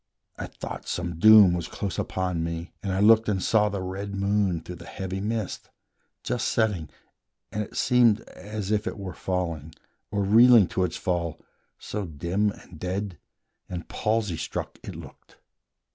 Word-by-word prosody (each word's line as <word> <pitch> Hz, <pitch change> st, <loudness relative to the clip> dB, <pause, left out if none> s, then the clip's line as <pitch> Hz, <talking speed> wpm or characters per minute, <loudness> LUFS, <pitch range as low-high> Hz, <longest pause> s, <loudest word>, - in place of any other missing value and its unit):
I -, -, -5 dB
thought -, -, -8 dB
Some 85 Hz, -2 st, -3 dB
doom 105 Hz, -2 st, +8 dB
was 85 Hz, -1 st, -2 dB
close 100 Hz, -2 st, -4 dB
upon 90 Hz, -3 st, -1 dB
me, 85 Hz, +1 st, -5 dB
and 100 Hz, -, -2 dB
I 95 Hz, -, 0 dB
looked 110 Hz, +1 st, +6 dB
And 100 Hz, -2 st, +1 dB
saw 105 Hz, +2 st, +3 dB
the 100 Hz, -2 st, -3 dB
red 100 Hz, +2 st, -5 dB
moon 100 Hz, -3 st, +1 dB
through 90 Hz, +2 st, -8 dB
the -, -, -12 dB
heavy 95 Hz, 0 st, -4 dB
mist, 110 Hz, -1 st, -3 dB, 0.5 s
Just -, -, -1 dB
setting, 100 Hz, -9 st, 0 dB, 0.6 s
and 105 Hz, -, -2 dB
it 105 Hz, -, -7 dB
seemed 120 Hz, -3 st, +4 dB
as 105 Hz, +1 st, -6 dB
if 105 Hz, 0 st, +1 dB
it 115 Hz, -, -3 dB
were 95 Hz, -2 st, -6 dB
falling, 85 Hz, -5 st, -3 dB, 0.3 s
Or 100 Hz, -1 st, 0 dB
reeling 115 Hz, +2 st, +7 dB
to 95 Hz, -, +1 dB
its 85 Hz, -, -4 dB
fall, 85 Hz, -3 st, -2 dB, 0.4 s
so 105 Hz, -1 st, -4 dB
dim 85 Hz, +7 st, 0 dB
and 90 Hz, -4 st, -11 dB
dead 95 Hz, 0 st, -3 dB, 0.5 s
And 90 Hz, -2 st, -5 dB
palsy 105 Hz, -5 st, -1 dB
struck -, -, -5 dB
it -, -, -8 dB
looked. -, -, -13 dB
95 Hz, 165 wpm, -26 LUFS, 90-105 Hz, 0.6 s, doom